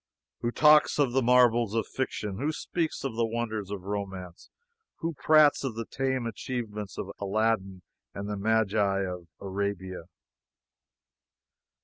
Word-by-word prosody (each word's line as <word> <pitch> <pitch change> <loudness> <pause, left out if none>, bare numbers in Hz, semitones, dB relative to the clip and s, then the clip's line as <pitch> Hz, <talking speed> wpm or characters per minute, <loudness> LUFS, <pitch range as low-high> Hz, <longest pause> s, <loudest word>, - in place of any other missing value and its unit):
Who 120 - -1
talks 150 +4 +5
of 140 -4 +3
the 135 +2 +2
marvels 120 -3 +4
of 115 -3 +1
fiction? 105 -6 -3
Who 150 +3 0
speaks 160 +1 -3
of 135 -5 -3
the 115 - +1
wonders 110 -3 -2
of 100 -3 -5
romance? 95 -3 -6 0.5
Who 165 0 -3
prates 155 0 +5
of 130 -5 -3
the 115 0 -4
tame 130 -1 -1
achievements 105 -2 -5
of 95 - -4
Aladdin 100 -2 0 0.3
and 100 +5 -6
the 105 - -2
Magii 100 -2 +1
of 90 -2 -10
Arabia? 95 -2 -4
110 Hz, 135 wpm, -28 LUFS, 100-125 Hz, 0.5 s, talks